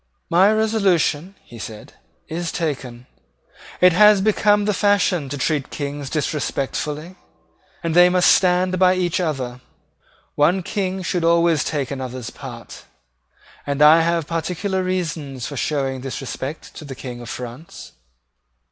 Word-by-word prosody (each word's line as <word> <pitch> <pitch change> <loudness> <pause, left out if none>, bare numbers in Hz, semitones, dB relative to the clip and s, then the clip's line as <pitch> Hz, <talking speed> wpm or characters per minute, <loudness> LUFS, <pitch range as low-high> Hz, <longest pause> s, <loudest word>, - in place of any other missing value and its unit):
"My 185 +5 +5
resolution," 200 -6 +1
he 120 - -13
said, 110 -1 -9 0.3
"is 165 +1 -4
taken. 130 -7 -4 0.8
It 180 -1 +6
has 210 +2 +6
become 210 0 +2
the 210 - +1
fashion 190 -7 +1
to 145 - -4
treat 145 0 -1
Kings 145 -1 -5
disrespectfully; 150 +2 -3 0.7
and 165 -1 -1
they 175 0 +7
must 180 0 +4
stand 185 0 +2
by 185 0 +5
each 180 -1 0
other. 130 -7 -3 0.7
One 175 +6 +2
King 190 0 -3
should 175 0 -1
always 170 -2 +3
take 145 -4 -3
another's 130 -3 -5
part: - - -10 0.8
and 140 0 -2
I 155 +2 +7
have 170 -1 0
particular 180 +4 -2
reasons 160 -8 -3
for 145 - -6
showing 135 -2 -2
this 135 0 -5
respect 135 +3 -6
to - - -8
the 140 -3 -8
King 125 -2 -8
of 120 - -9
France." 125 - -8
165 Hz, 140 wpm, -21 LUFS, 140-185 Hz, 0.8 s, they